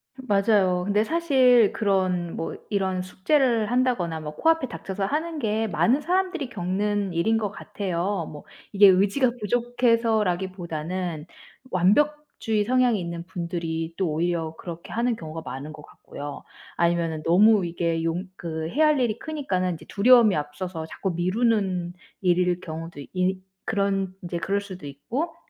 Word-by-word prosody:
맞아요. 200 -7 +2
근데 205 +2 +2
사실 260 -7 +4
그런 185 -5 0
뭐 165 - -4
이런 190 -2 0
숙제를 225 +3 +1
한다거나 240 -10 +1
뭐 150 -1 -6
코앞에 325 - +2
닥쳐서 195 -4 -4
하는 315 +7 -2
게 220 -4 0
많은 255 +6 +2
사람들이 355 -3 -1
겪는 200 0 -1
일인 185 +7 +2
것 210 -3 -2
같아요. 190 -3 -3
뭐 150 -1 -10 0.3
이게 200 0 +8
의지가 200 +7 +4
부족해서라기보다는 190 -8 0 0.4
완벽주의 225 - +1
성향이 250 -2 +3
있는 170 -1 -5
분들이 170 -2 -4
또 185 -2 0
오히려 165 0 -1
그렇게 170 -1 -8
하는 235 +1 0
경우가 160 -4 -7
많은 135 +4 -6
것 155 -1 -11
같고요. 145 0 -9 0.3
아니면은 170 -2 +1
너무 200 +4 +5
이게 170 -1 -1
용 165 +3 -1
그 160 -1 -4
해야 305 - +3
할 300 -2 +3
일이 235 -3 0
크니까는 190 - -2
이제 - - -13
두려움이 230 -1 +5
앞서서 160 +3 -4
자꾸 190 +3 -3
미루는 185 -1 0 0.3
일일 180 -1 +2
경우도 165 -1 -7
이 185 +1 0 0.3
그런 195 -2 0
이제 175 0 -3
그럴 195 +2 0
수도 190 -6 -9
있고 245 - -4
190 Hz, 320 characters per minute, -25 LUFS, 170-230 Hz, 0.4 s, 이게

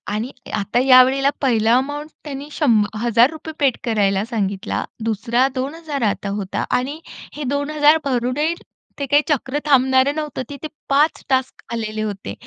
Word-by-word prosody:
आणि 235 +5 -3 0.3
आता 205 +5 0
या 255 -1 +9
वेळेला 270 +2 +2
पहिलं 225 -5 +2
अमाउंट 290 +3 -3
त्यांनी 285 0 -7
शंभ 230 -10 +3 0.2
हजार 235 +2 +4
रुपये 315 0 -8
पेड 275 -4 +2
करायला 205 -4 +1
सांगितला. 210 -3 -2 0.2
दुसरा 230 +3 +1
2000 285 +1 -4
आता 200 - -5
होता 195 -1 -3
आणि 280 +5 -5 0.3
हे 295 - -6
2000 295 +2 +3
भरूनही 270 +5 0 0.5
ते 280 - -1
काही 290 +1 +6
चक्र 290 -1 0
थांबणारं 265 0 +3
नव्हतं 300 -3 -4
तिथे 285 +2 -6 0.2
5 295 +3 +2
टास्क 260 -1 0
आलेले 215 -1 -3
होते. 200 - -4
260 Hz, 150 wpm, -20 LUFS, 230-290 Hz, 0.5 s, या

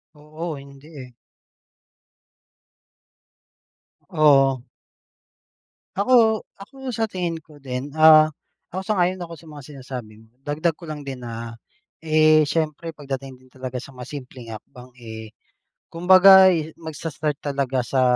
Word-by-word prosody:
Oo. 155 +2 -7
Hindi, 140 +1 -14
eh. 130 -3 -10 3.0
Oo. 135 -4 +4 1.3
Ako, 220 +1 +4 0.2
ako 265 +6 -9
sa 225 -2 -1
tingin 180 -5 -3
ko 150 -3 -17
din, 135 +1 -5
ah, 155 0 +7 0.5
ako 190 - -3
sang-ayon 185 -2 0
ako 170 -2 -7
sa 165 - -17
mga 150 -2 -11
sinasabi 125 -6 -10
mo. 110 - -30
Dagdag 155 +4 -1
ko 165 +1 -12
lang 150 -2 -7
din 135 -2 -7
na, 115 -1 -7 0.5
eh, 155 -1 +4
siyempre 160 0 -2
pagdating 135 -2 -6
din 130 - -23
talaga 130 -1 -6
sa 135 +2 -9
mga 125 0 -10
simpleng 125 -4 -9
hakbang, 125 +3 -16
eh, 110 -2 -9 0.6
kumbaga, 190 +2 +7
eh, 160 -3 -2
magsa-start 155 -2 -5
talaga 135 -3 -2
sa, 130 -1 +1
150 Hz, 125 wpm, -22 LUFS, 130-165 Hz, 3.0 s, ah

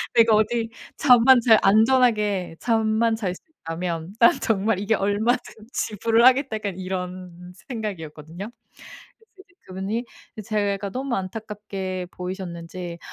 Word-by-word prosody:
내가 230 -2 +6
어디 225 +2 +1 0.3
잠만 250 -1 +6
잘 225 -2 +6
안전하게 210 -4 +3
잠만 225 0 +1
잘 195 -5 -2
수 - - -16 0.2
있다면 165 +1 -4
'난 235 - +7
정말 210 -2 +1
이게 205 +2 +1
얼마든 210 +5 0 0.2
지불을 225 +3 +1
하겠다.' 260 -2 +4
약간 205 -4 -4
이런 180 -1 -6 0.2
생각이었거든요. 175 - -6 0.8
그래서 - - -51
이제 340 - -30
그분이 195 +6 -3 0.3
이 - - -5
제가 200 -1 -1
너무 260 +1 -2
안타깝게 195 -2 -5
보이셨는지 180 -1 -7
205 Hz, 295 characters per minute, -23 LUFS, 185-225 Hz, 0.8 s, 난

